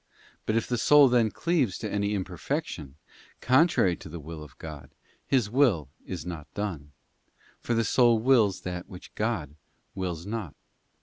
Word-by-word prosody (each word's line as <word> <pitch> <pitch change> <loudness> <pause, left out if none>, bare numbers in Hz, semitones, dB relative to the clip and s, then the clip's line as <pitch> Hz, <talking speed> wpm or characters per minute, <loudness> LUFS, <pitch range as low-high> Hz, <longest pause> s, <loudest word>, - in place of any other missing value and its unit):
But 110 - +1
if 115 - +1
the 120 -2 -1
soul 145 +2 +7
then 120 -3 +3
cleaves 140 - 0
to - - -4
any 100 0 -1
imper 90 -3 -6
fection, 90 - -4 0.4
contrary 130 - +4
to - - -11
the 85 +2 -7
will 80 +1 -8
of 75 -3 -13
God, 75 -4 -9 0.4
His 125 -6 +2
will 105 - +2 0.2
is 90 -3 -5
not 85 -4 -7
done, 85 -9 -4 0.7
for 120 - -1
the 115 0 +2
soul 120 -1 +4
wills 110 -5 +3
that 90 0 -5
which 90 - -11
God 105 -11 -2 0.4
wills 90 -3 -4
not. 100 - -5
100 Hz, 165 wpm, -27 LUFS, 85-120 Hz, 0.7 s, soul